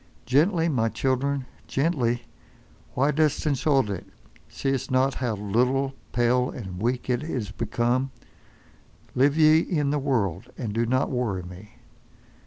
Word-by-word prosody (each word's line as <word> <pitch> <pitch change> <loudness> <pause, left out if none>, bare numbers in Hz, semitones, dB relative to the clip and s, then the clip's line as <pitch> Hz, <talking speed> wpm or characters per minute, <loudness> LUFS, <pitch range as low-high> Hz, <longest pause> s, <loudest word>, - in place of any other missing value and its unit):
Gently, 165 +5 +3
my 120 -8 +1
children, 135 +2 0 0.2
gently! 130 -5 0 0.7
Why 140 +3 +3
dost 150 0 +1
insult 140 -3 +2
it—see'st 130 +6 -5
not 130 +1 +2
how 120 -4 -2
little, 125 +7 +1 0.2
pale 125 +1 +2
and 95 -6 -7
weak 125 +2 -1
it 125 -1 0
is 125 -10 -4
become? 120 +4 0 1.0
Live 140 +4 +3
ye 155 0 +6
in 150 -5 0
the 150 - +1
world—and 115 - -2
do 115 +1 0
not 130 +4 +1
worry 115 -8 -1
me. 90 +4 -12
130 Hz, 125 wpm, -25 LUFS, 115-140 Hz, 1.0 s, ye